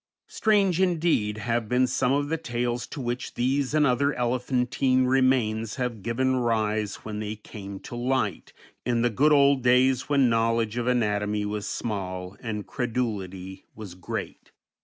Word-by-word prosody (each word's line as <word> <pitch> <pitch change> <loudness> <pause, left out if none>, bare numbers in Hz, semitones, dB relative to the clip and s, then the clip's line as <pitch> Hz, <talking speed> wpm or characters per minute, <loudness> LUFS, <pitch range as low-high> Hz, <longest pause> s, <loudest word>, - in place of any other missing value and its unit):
Strange 195 -5 +2
indeed 165 - +1
have 115 0 -2
been 125 +1 +3
some 125 0 0
of 145 +1 +1
the 165 - 0
tales 120 -4 -2
to 150 - -8
which 125 0 -4
these 135 +3 0
and 150 -1 +4
other 140 +2 +2
elephantine 130 +1 +1
remains 125 -4 +2
have 125 -5 -3
given 130 +5 0
rise 110 -3 -1
when 105 -1 -4
they 105 0 -4
came 100 -2 -9
to - - -9
light 120 -6 -1 0.3
in 120 -1 0
the 120 - +2
good 145 +8 +3
old 140 -2 +5
days 125 +2 +3
when 140 -3 +4
knowledge 115 -1 +1
of 120 0 -2
anatomy 105 -4 0
was 105 0 -3
small 95 -4 -4
and 105 -3 -4
credulity 100 -7 -4
was 105 -4 -8
great. 90 -1 -6
120 Hz, 155 wpm, -26 LUFS, 105-130 Hz, 0.3 s, old